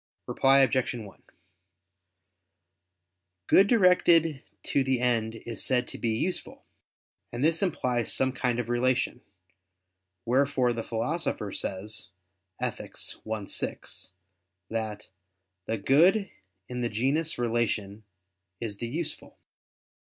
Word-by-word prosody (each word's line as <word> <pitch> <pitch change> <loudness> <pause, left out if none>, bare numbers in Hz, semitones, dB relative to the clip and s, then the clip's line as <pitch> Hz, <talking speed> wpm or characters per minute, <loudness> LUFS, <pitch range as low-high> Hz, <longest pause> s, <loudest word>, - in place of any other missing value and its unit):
Reply 135 +1 +4
Obj. 130 -1 +2
1: 105 -5 -10 2.2
Good 195 - +6
directed 175 - +4 0.2
to 140 - +1
the 130 -1 +1
end 115 -2 +1
is 115 0 -3
said 125 -1 +1
to - - -6
be 110 -1 0
useful; 185 +9 -3 0.7
and 120 +3 -3
this 165 0 +3
implies 125 - +1
some 130 0 +3
kind 125 -2 -1
of 120 - -2
relation: 125 +1 0 1.0
wherefore 130 0 +2
the 115 - -3
Philosopher 115 - -2
says 100 0 -3 0.5
(Ethic. - - -4 0.4
i, 110 -2 -2
6) 95 - -4 0.6
that 110 -2 -4 0.6
"the 115 - -1
good 175 - +4 0.4
in 125 0 -4
the 120 - 0
genus 140 +9 0
'relation' 115 -3 -1 0.6
is 105 -4 -4
the 120 - -4
useful." 160 +5 -5
125 Hz, 110 wpm, -28 LUFS, 115-140 Hz, 2.2 s, Good